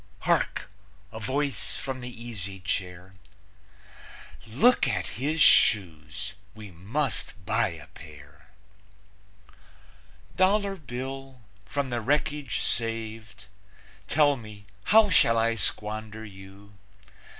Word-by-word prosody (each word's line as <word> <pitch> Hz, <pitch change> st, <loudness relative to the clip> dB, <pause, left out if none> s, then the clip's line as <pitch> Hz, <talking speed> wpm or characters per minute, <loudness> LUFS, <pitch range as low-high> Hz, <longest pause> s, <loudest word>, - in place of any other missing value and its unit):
(Hark! -, -, 0 dB, 0.4 s
A 110 Hz, -, -7 dB
voice 135 Hz, +3 st, -1 dB
from 130 Hz, -2 st, -5 dB
the 125 Hz, -, -6 dB
easy 110 Hz, -6 st, -7 dB
chair: 90 Hz, -1 st, -4 dB, 1.3 s
"Look 155 Hz, -, +4 dB
at -, -, -1 dB, 0.2 s
his 155 Hz, +4 st, 0 dB
shoes! 95 Hz, 0 st, +4 dB, 0.2 s
We 105 Hz, -3 st, -10 dB
must 100 Hz, -, -3 dB
buy -, -, +2 dB
a -, -, -8 dB
pair.") 75 Hz, +1 st, -15 dB, 1.9 s
Dollar 195 Hz, +1 st, +2 dB
Bill, 135 Hz, -3 st, -7 dB, 0.2 s
from 140 Hz, -3 st, -2 dB
the 120 Hz, -1 st, -1 dB
wreckage 145 Hz, +3 st, 0 dB
saved, 110 Hz, -2 st, -3 dB, 0.6 s
Tell 145 Hz, -1 st, +4 dB
me, 105 Hz, -3 st, -12 dB, 0.2 s
how 215 Hz, -2 st, +6 dB
shall 115 Hz, -7 st, +5 dB
I 115 Hz, +1 st, +2 dB
squander 110 Hz, 0 st, -3 dB
you? 95 Hz, 0 st, -13 dB
115 Hz, 100 wpm, -27 LUFS, 100-135 Hz, 1.9 s, how